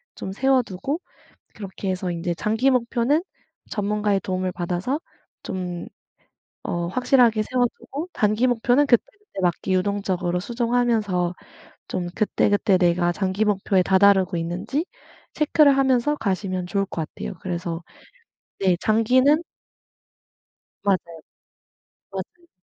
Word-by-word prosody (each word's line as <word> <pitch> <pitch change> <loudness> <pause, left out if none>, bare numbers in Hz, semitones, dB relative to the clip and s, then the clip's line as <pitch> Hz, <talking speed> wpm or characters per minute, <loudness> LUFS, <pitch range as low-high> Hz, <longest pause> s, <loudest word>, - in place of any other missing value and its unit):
좀 190 - -6
세워 265 +5 +3
두고 240 - -4 0.6
그렇게 195 -1 -6
해서 185 0 -3
인제 170 0 -2
장기 220 +8 +1
목표는 250 +4 +1 0.5
전문가의 210 -1 0
도움을 185 0 -2
받아서 180 - -2 0.4
좀 180 -3 -5 0.8
어 170 0 -2
확실하게 240 0 +3
세워 245 +3 +1
두고 280 +8 -6
단기 215 +4 +2
목표는 245 +3 +3
그때그때 395 - 0
막 175 -2 +3
유동적으로 185 -2 0
수정하면서 230 -5 0 0.6
좀 180 -1 -3
그때그때 205 -2 +2
내가 175 -1 +2
장기 190 +3 -1
목표에 195 -2 +2
다다르고 190 0 +4
있는지 175 - -2 0.5
체크를 300 -2 +4
하면서 270 +2 +2
가시면 185 -5 -2
좋을 195 +2 0
것 165 -4 -4
같아요. - - -7
그래서 175 -2 -4 0.8
네 185 -2 +2
장기는 255 +8 +3 1.4
맞아요. 175 -5 -1 0.9
맞아요. 195 - -8
200 Hz, 275 characters per minute, -23 LUFS, 185-245 Hz, 1.4 s, 다다르고